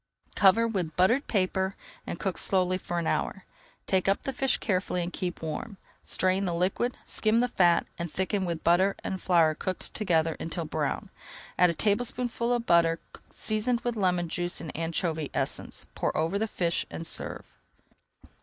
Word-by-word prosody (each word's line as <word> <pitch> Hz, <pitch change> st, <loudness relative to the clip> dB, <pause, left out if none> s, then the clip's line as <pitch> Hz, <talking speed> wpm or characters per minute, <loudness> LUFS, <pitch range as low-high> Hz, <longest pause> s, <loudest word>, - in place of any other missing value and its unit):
Cover 205 Hz, +4 st, +5 dB
with 180 Hz, -8 st, -2 dB
buttered 230 Hz, +10 st, +3 dB
paper 190 Hz, -1 st, 0 dB, 0.3 s
and -, -, -4 dB
cook 190 Hz, -5 st, -2 dB
slowly 185 Hz, -1 st, +2 dB
for 175 Hz, -1 st, -4 dB
an 170 Hz, -, -1 dB
hour. 190 Hz, +3 st, -1 dB, 0.4 s
Take 190 Hz, -1 st, +1 dB
up 195 Hz, -, +2 dB
the 270 Hz, -, -2 dB
fish 270 Hz, +1 st, +1 dB
carefully 185 Hz, -3 st, 0 dB
and 175 Hz, -, -5 dB
keep 180 Hz, -2 st, -4 dB
warm. 190 Hz, +6 st, -4 dB, 0.3 s
Strain 185 Hz, +1 st, +1 dB
the 175 Hz, -2 st, -1 dB
liquid, 195 Hz, +8 st, 0 dB
skim 220 Hz, +1 st, +2 dB
the 245 Hz, -, +3 dB
fat, 175 Hz, -7 st, +3 dB
and 170 Hz, -2 st, -3 dB
thicken 190 Hz, +3 st, -1 dB
with 170 Hz, -2 st, -3 dB
butter 185 Hz, +4 st, +4 dB
and 190 Hz, -, -3 dB
flour 165 Hz, -4 st, +4 dB
cooked 185 Hz, +3 st, -5 dB
together 165 Hz, -6 st, +1 dB
until 165 Hz, 0 st, -4 dB
brown. 150 Hz, -2 st, -2 dB, 0.4 s
Add 180 Hz, 0 st, +5 dB
a 170 Hz, -, -1 dB
tablespoonful 235 Hz, +3 st, 0 dB
of 240 Hz, -1 st, 0 dB
butter, 165 Hz, -3 st, +4 dB, 0.3 s
seasoned 230 Hz, +3 st, -1 dB
with 240 Hz, -1 st, -2 dB
lemon 180 Hz, -4 st, +1 dB
juice 175 Hz, +1 st, -2 dB
and 165 Hz, -, -7 dB
anchovy 165 Hz, -2 st, -1 dB
essence, -, -, -2 dB
pour -, -, -1 dB
over 165 Hz, +6 st, +1 dB
the 220 Hz, -, 0 dB
fish, 170 Hz, -5 st, 0 dB
and 165 Hz, -, -6 dB
serve. -, -, -3 dB
185 Hz, 170 wpm, -28 LUFS, 170-210 Hz, 0.4 s, Cover